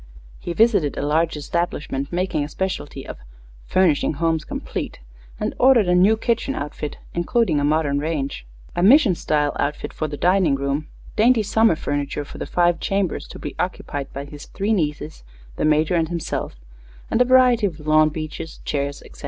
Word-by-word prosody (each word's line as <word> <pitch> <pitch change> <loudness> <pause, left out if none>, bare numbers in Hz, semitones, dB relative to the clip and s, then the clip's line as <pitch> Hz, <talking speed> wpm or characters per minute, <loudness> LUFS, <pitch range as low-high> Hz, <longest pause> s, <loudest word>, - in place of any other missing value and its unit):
He 175 - -4
visited 210 -9 +3
a 140 - -1
large 160 +2 +1
establishment 150 -3 -3
making 175 -4 -1
a 145 - -5
specialty 150 -6 -4
of - - -8 0.5
"furnishing 165 -7 +2
homes 160 0 0
complete," - - -5 0.4
and - - -2
ordered 250 -6 +5
a 180 - +3
new 195 +5 +5
kitchen 235 +4 -1
outfit, 145 0 -5 0.2
including 175 -1 +1
a - - -1
modern 145 -1 +1
range, 145 - -3 0.3
a - - 0
mission 235 - +6
style 150 -3 0
outfit 145 +1 -2
for 155 - -3
a 150 -1 -5
dining 180 -4 +3
room, 140 +2 -2 0.3
dainty 230 +1 +4
summer 220 -2 +3
furniture 145 -1 -3
for - - -11
the - - -4
five 175 -1 +2
chambers 195 -4 -1
to - - -10
be - - -7
occupied 140 -1 -3
by 140 +1 -6
his 145 0 -11
three 205 +3 -1
nieces, 150 - -2 0.3
the - - 0
Major 155 +2 +3
and 165 -2 +1
himself, 170 - -3 0.6
and 235 - +2
a - - +6
variety 250 -4 +5
of 165 -4 -7
lawn 155 0 +4
benches, 155 +1 -6
chairs, 140 -1 -2
etc. - - -15
160 Hz, 175 wpm, -22 LUFS, 145-195 Hz, 0.6 s, mission